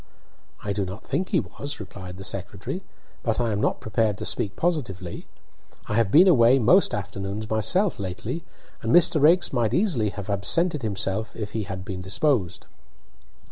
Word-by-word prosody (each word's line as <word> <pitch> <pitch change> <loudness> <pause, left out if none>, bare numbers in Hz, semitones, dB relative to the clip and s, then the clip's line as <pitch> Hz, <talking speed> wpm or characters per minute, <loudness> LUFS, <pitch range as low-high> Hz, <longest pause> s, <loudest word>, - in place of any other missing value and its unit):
"I 100 - -2
do 100 - -1
not 95 +3 -7
think 185 - -2
he 180 - +2
was," 140 -1 -6
replied 95 -3 -9
the 95 - -8
secretary, 100 - -4 0.4
"but 115 -1 -1
I 120 -2 0
am 105 0 -1
not - - 0
prepared 110 -1 0
to - - -5
speak 100 -1 -1
positively. 110 - -3 0.6
I - - -3
have 115 -2 +2
been 170 - +7
away 130 -6 +6
most 135 - +4
afternoons 100 +1 -5
myself 130 - +2
lately, 105 - -4 0.4
and 115 - -1
Mr. 165 -2 +5
Raikes 170 +3 +4
might 120 -2 +1
easily 160 - +1
have 100 -1 -7
absented 150 - +2
himself 110 0 -2
if 105 -2 -5
he 110 -2 -3
had 95 0 -6
been 95 -2 -5
disposed." 95 - 0
110 Hz, 170 wpm, -25 LUFS, 100-145 Hz, 0.6 s, been